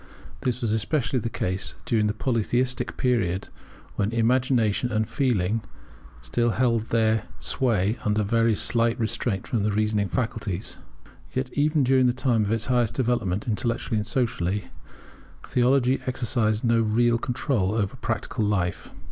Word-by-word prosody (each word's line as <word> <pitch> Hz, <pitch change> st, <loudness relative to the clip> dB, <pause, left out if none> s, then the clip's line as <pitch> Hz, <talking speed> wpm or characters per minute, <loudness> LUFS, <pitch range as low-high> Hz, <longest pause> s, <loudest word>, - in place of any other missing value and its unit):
This 125 Hz, -1 st, -1 dB
was 115 Hz, -3 st, 0 dB
especially 125 Hz, +4 st, 0 dB
the 115 Hz, -, -3 dB
case 95 Hz, -3 st, -2 dB
during 115 Hz, -8 st, +2 dB
the 105 Hz, -, -1 dB
Polytheistic 125 Hz, +2 st, -1 dB
period, 100 Hz, -8 st, 0 dB, 0.5 s
when 105 Hz, +1 st, 0 dB
Imagination 120 Hz, -1 st, +2 dB
and 110 Hz, 0 st, 0 dB
Feeling 115 Hz, -5 st, 0 dB, 0.6 s
still 120 Hz, -, +1 dB
retained 120 Hz, -3 st, +2 dB
their 110 Hz, -1 st, +1 dB
sway 110 Hz, -3 st, +1 dB
under 105 Hz, 0 st, +1 dB
very 115 Hz, +1 st, +2 dB
slight 115 Hz, +2 st, +2 dB
restraint 110 Hz, -2 st, -1 dB
from 115 Hz, -, -1 dB
the 105 Hz, +1 st, +1 dB
reasoning 105 Hz, -1 st, +1 dB
faculties. 110 Hz, -5 st, -3 dB, 0.5 s
Yet 130 Hz, 0 st, -3 dB
even 150 Hz, 0 st, +2 dB
during 130 Hz, 0 st, +4 dB
the 120 Hz, -, +2 dB
time 125 Hz, -4 st, +1 dB
of 100 Hz, -, -2 dB
its 115 Hz, 0 st, 0 dB
highest 120 Hz, -3 st, +1 dB
development, 115 Hz, -6 st, 0 dB
intellectually 115 Hz, 0 st, -1 dB
and 105 Hz, +1 st, -2 dB
socially, 105 Hz, -6 st, -1 dB, 0.7 s
theology 130 Hz, +1 st, +2 dB
exercised 115 Hz, -4 st, 0 dB
no 115 Hz, -1 st, +3 dB
real 115 Hz, +2 st, +2 dB
control 115 Hz, -5 st, -1 dB
over 100 Hz, -4 st, -1 dB
practical 115 Hz, -1 st, -2 dB
life. 95 Hz, -4 st, -1 dB
115 Hz, 140 wpm, -25 LUFS, 105-125 Hz, 0.7 s, during